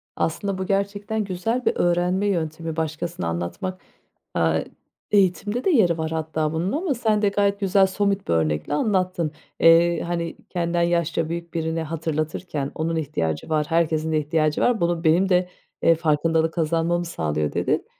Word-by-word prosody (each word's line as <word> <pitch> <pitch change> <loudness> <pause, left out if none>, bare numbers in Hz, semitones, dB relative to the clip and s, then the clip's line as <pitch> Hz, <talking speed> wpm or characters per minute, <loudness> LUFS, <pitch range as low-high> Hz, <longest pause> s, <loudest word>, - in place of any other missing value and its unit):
Aslında 195 +4 -1
bu 190 - -3
gerçekten 200 +2 -1
güzel 215 +6 -2
bir - - +2
öğrenme 175 +3 +1
yöntemi, 165 -3 -2
başkasına 160 - -3
anlatmak, 85 - -4 0.5
aaa, - - +2 0.5
eğitimde 205 +4 +2
de - - +2
yeri 195 - +4
var 160 0 -3
hatta 160 -1 -1
bunun 170 +4 -1
ama 320 +1 0
sen 220 -4 +1
de 205 - +3
gayet 200 0 +1
güzel, 195 -1 +4
somut 200 0 -1
bir - - +1
örnekle 80 - 0
anlattın. 185 -2 0 0.3
Eee, 165 0 +5
hani, 170 -1 -3
kendinden 170 -1 -1
yaşça 170 -1 0
büyük 170 0 -5
birine 160 -1 -1
hatırlatırken 155 -1 -3
onun 165 +1 -1
ihtiyacı 135 - -2
var, 155 -1 +1
herkesin 160 -1 +1
ihtiyacı 155 0 +1
var, 245 -5 +2
bunu 170 -1 0
benim 175 +4 +3
de, 180 -1 +2 0.3
eee, 165 - +5
farkındalık 160 +1 +1
kazanmamı 170 +1 0
sağlıyor, 75 - -2
dedin. - - 0
170 Hz, 155 wpm, -23 LUFS, 160-190 Hz, 0.5 s, Eee